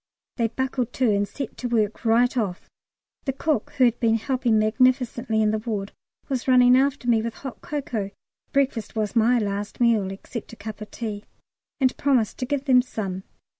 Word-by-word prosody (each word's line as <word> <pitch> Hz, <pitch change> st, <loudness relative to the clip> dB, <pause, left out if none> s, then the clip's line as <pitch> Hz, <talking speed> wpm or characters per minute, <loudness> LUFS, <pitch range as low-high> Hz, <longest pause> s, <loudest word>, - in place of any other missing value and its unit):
They 230 Hz, -2 st, +2 dB
buckled 255 Hz, +1 st, -2 dB
to 255 Hz, -4 st, +2 dB
and 200 Hz, 0 st, +1 dB
set 275 Hz, -, -6 dB
to 250 Hz, -, -3 dB
work 225 Hz, -1 st, 0 dB
right 240 Hz, +3 st, +3 dB
off. 200 Hz, -7 st, -2 dB, 0.6 s
The 270 Hz, -, 0 dB
cook, 275 Hz, -3 st, -1 dB
who 260 Hz, -, +4 dB
had 240 Hz, -1 st, +3 dB
been 225 Hz, -2 st, +3 dB
helping 245 Hz, -1 st, +1 dB
magnificently 235 Hz, 0 st, +2 dB
in 210 Hz, -, +3 dB
the 215 Hz, -, 0 dB
ward, 210 Hz, -3 st, -4 dB, 0.4 s
was 265 Hz, -2 st, -3 dB
running 250 Hz, -1 st, +6 dB
after 270 Hz, -1 st, +1 dB
me 230 Hz, -2 st, +4 dB
with 230 Hz, 0 st, -4 dB
hot 265 Hz, -5 st, -8 dB
cocoa 245 Hz, -9 st, -3 dB, 0.4 s
(breakfast 265 Hz, -6 st, 0 dB
was 215 Hz, -1 st, -1 dB
my 235 Hz, +2 st, +4 dB
last 205 Hz, -2 st, -3 dB
meal, 230 Hz, -5 st, +3 dB
except 205 Hz, +4 st, -8 dB
a -, -, -8 dB
cup 215 Hz, -1 st, -8 dB
of 210 Hz, -, -7 dB
tea), 215 Hz, -3 st, -5 dB, 0.5 s
and 260 Hz, -2 st, +2 dB
promised 255 Hz, -6 st, +1 dB
to 255 Hz, -, -2 dB
give 280 Hz, 0 st, -1 dB
them 255 Hz, -3 st, +6 dB
some. 195 Hz, -7 st, -5 dB
235 Hz, 185 wpm, -24 LUFS, 215-255 Hz, 0.6 s, running